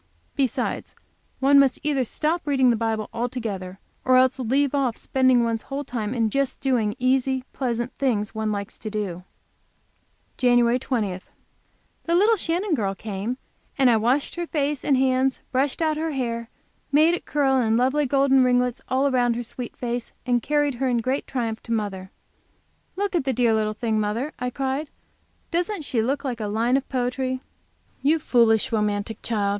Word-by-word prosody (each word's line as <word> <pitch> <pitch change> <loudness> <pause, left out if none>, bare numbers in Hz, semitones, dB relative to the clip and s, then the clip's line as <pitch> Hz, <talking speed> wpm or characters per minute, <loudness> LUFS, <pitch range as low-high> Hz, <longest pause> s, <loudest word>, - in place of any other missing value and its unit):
Besides, 265 -4 -1 0.4
one 280 +1 +6
must 270 -2 +4
either 285 -3 +1
stop 310 +7 -2
reading 265 -3 +4
the - - +2
Bible 220 -1 -1
altogether, 225 -6 -4 0.3
or 255 0 +5
else 260 +1 +3
leave 265 +3 +1
off 265 -5 0
spending 260 -2 +3
one's 230 -1 -1
whole 280 +1 -3
time 240 -3 -3
in 225 -3 +1
just 275 0 -1
doing 235 -6 +1
easy 260 +1 +1
pleasant 240 -1 -2
things 220 -7 0
one 220 -1 -1
likes 200 0 -5
to 215 - -5
do. 200 -5 -4 1.1
JAN. 245 -1 +4
20. 210 -8 -2 0.8
The 335 - +1
little 420 +5 +5
Shannon 355 0 -1
girl 200 -8 0
came, 215 +4 -4 0.4
and 265 -3 +5
I 225 - +4
washed 245 +6 +1
her 345 -1 -3
face 290 -3 -1
and 275 -3 +3
hands, 260 0 +2
brushed 275 +4 0
out 310 -1 +1
her 320 0 -2
hair 240 -4 -1
and 235 - -10 0.4
made 310 +4 +5
it 350 - -3
curl 275 -2 +2
in 225 -3 +2
lovely 265 +4 +2
golden 270 0 +4
ringlets 250 0 +1
all 270 +2 +2
round 245 -2 +2
her 240 - -3
sweet 240 +1 -7
face, 240 -1 -4
and 245 -2 +2
carried 290 +2 +1
her 265 - +2
in 245 - +1
great 255 +4 -1
triumph 230 -4 -3
to - - -9
mother. 200 -4 -2 0.9
"Look 400 0 -2
at 345 - +1
the 265 -1 0
dear 240 -2 +3
little 215 -1 0
thing, 220 -1 0
mother!" 225 +8 -2
I 250 0 -1
cried; 270 +3 -2 0.6
"doesn't 350 +1 -1
she 250 -5 0
look 270 +6 -1
like 250 -4 -3
a 215 - -2
line 230 +4 +1
of 275 - -1
poetry?" 255 0 -1 0.6
"You 295 +4 +3
foolish, 230 -7 +3
romantic 210 0 -1
child!" 210 -4 0
250 Hz, 175 wpm, -24 LUFS, 225-275 Hz, 1.1 s, one